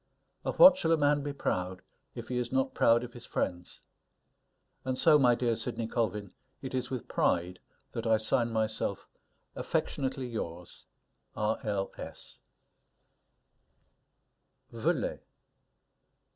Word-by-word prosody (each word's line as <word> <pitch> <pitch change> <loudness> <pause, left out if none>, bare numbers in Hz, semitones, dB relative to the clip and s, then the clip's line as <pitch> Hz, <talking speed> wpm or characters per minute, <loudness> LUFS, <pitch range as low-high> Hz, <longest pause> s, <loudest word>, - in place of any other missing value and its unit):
Of - - -3
what 275 0 +9
shall 165 -10 +1
a - - +3
man 145 -1 +3
be 145 0 -3
proud, 90 -9 -3 0.3
if - - -7
he 125 -1 -1
is 120 -1 -3
not 130 0 +1
proud 115 +1 +4
of 120 0 -8
his 120 0 -10
friends? 90 -1 -3 1.0
And 130 0 -2
so, 150 0 +6
my 125 -3 +5
dear 120 -1 0
Sidney 115 0 -3
Colvin, 105 -4 -2 0.3
it 130 - -7
is 125 -1 -2
with 125 -3 -5
pride 90 +1 0 0.3
that - - -4
I 110 -1 +5
sign 115 +2 +1
myself 110 -3 -1 0.5
Affectionately 135 -1 -2
yours, 90 -7 -6 0.5
R. 105 +1 0
L. 100 -3 -2
120 Hz, 120 wpm, -30 LUFS, 105-130 Hz, 1.0 s, what